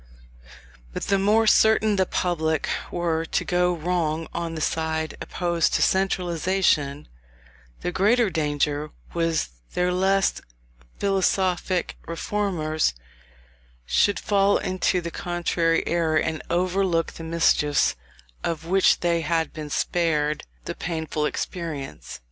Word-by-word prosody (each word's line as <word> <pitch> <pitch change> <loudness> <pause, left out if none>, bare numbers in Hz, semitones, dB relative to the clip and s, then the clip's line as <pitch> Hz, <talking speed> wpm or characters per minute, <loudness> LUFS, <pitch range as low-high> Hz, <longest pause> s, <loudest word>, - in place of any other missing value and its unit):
But - - -4
the 195 -1 +1
more 215 +3 +3
certain 220 0 +4
the 190 -2 +2
public 160 -3 0 0.2
were 165 -2 -1
to 165 - -2
go 180 0 +2
wrong 165 -2 -1
on 170 -1 -3
the - - -4
side 160 0 -1
opposed 170 -2 0
to - - +3
centralization, 175 -5 +1 0.7
the 180 - -2
greater 215 +3 +3
danger 150 -1 -1 0.2
was 165 - 0 0.3
there 180 0 +1
lest 195 +1 +2 0.6
philosophic 190 -2 0
reformers 165 - -1 0.9
should 205 - +2
fall 200 0 +3
into 185 0 0
the 170 0 -5
contrary 170 -1 0
error, 165 -2 +1
and 160 0 -1
overlook 180 -1 +1
the 165 - -9
mischiefs 160 -3 +2 0.5
of 165 -1 -2
which 190 +2 +3
they 170 -1 +1
had 165 +1 -1
been 155 -2 -6
spared 155 -2 0 0.2
the - - -3
painful 160 -2 -2
experience. 155 -7 -5
170 Hz, 115 wpm, -24 LUFS, 160-185 Hz, 0.9 s, certain